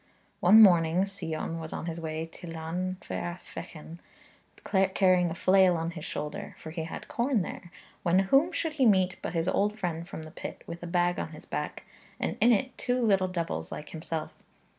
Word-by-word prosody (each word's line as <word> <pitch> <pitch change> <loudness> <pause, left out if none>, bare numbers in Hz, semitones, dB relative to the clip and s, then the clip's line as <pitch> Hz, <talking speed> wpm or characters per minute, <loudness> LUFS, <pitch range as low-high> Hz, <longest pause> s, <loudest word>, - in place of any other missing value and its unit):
One 215 +5 +8
morning 175 -1 +5
Sion 165 -4 -4
was 160 -1 -6
on - - -4
his 170 -1 -4
way 160 0 -3
to 165 +1 -12
Llanfair 175 +2 -4
Fechan, 160 +1 -9 1.0
carrying 185 -3 +4
a 165 - -4
flail 185 -1 +5
on 165 +1 -2
his 160 -2 -7
shoulder, 150 0 -5
for 160 - -9
he 160 -1 -4
had 165 - -7
corn 240 -4 +1
there, 175 - -8 0.3
when 175 0 +3
whom 275 - +4
should 325 -2 -2
he 270 -5 +3
meet 190 -3 +3
but - - -4
his 165 0 0
old 210 +3 +1
friend 170 -4 -3
from 160 - -6
the 155 - -10
pit, - - -8
with 170 0 -7
a 175 - -5
bag 175 0 +1
on - - -4
his - - -11
back, - - -4 0.4
and - - -1
in 240 - +6
it 255 +4 +1
two 250 -1 0
little 195 -5 +3
devils 165 - -3
like 150 - -7
himself. 160 -1 -5
175 Hz, 190 wpm, -29 LUFS, 165-195 Hz, 1.0 s, One